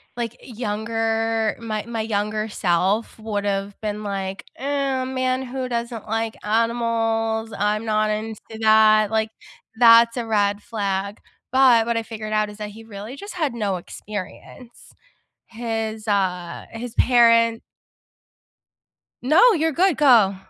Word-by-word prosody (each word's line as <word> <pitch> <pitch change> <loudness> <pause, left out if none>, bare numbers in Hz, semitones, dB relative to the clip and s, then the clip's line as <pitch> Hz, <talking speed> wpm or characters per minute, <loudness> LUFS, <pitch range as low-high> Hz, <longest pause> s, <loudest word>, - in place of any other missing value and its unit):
like, 235 -1 -4
younger 225 -1 -1
my 215 -2 -4
my 230 -1 -5
younger 215 0 -2
self 195 +3 0
would've 205 -2 -2
been 210 0 -3
like, 195 -1 -4
"Oh, 275 -1 -1
man, 255 0 -1
who 260 0 -4
doesn't 235 -2 -4
like 225 +1 -2
animals? 225 0 0
I'm 210 +2 0
not 215 -1 +1
into 215 0 -4 0.2
that, 215 -1 +5
like, 220 0 +1 0.5
that's 230 0 +7
a 240 - -3
red 205 -2 0
flag." 200 -2 -3 0.3
But, 255 -4 +5
what 235 -1 0
I 230 - -1
figured 215 -1 -7
out 215 -1 +1
is 210 - -11
that 210 - -5
he 220 +2 -12
really 215 +5 -9
just 405 +1 -8
had 310 -8 -1
no 205 -5 -1
experience. 205 +6 -9 0.5
His, 225 -1 -4
uh 185 -4 -1
his 235 +1 -7
parent 230 -2 +4 1.6
No, 340 - +5
you're 320 -2 +1
good, 360 +1 +2
go. 230 -10 +5
225 Hz, 130 wpm, -22 LUFS, 210-235 Hz, 1.6 s, that's